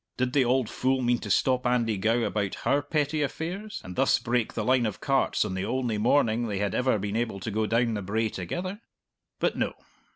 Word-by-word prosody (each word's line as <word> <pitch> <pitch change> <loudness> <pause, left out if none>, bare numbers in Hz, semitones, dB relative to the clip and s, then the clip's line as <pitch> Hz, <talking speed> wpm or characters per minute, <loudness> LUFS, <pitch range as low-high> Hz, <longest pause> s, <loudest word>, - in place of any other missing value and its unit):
Did 130 0 0
the 140 - +4
auld 125 -1 +2
fool 130 +2 0
mean 120 0 +2
to 105 - -7
stop 125 +5 +2
Andy 120 -3 +1
Gow 115 +4 +1
about 100 -3 -1
her 140 +1 +3
petty 150 +1 -1
affairs, 185 +9 -4
and 90 -1 -8
thus 135 - +3
break 120 -2 -1
the 110 - -1
line 125 -2 +3
of 105 - -5
carts - - +1
on - - -3
the 95 0 -2
only 125 -5 -1
morning 115 0 +2
they 105 -3 -2
had 100 -1 -1
ever 125 -3 +2
been 100 +1 -3
able 115 -4 -1
to 110 +4 -4
go 110 +1 0
down 115 +1 +2
the 105 - -2
brae 110 +4 -1
together? 180 - -5 0.6
But - - +1
no. - - 0
120 Hz, 220 wpm, -27 LUFS, 105-130 Hz, 0.6 s, the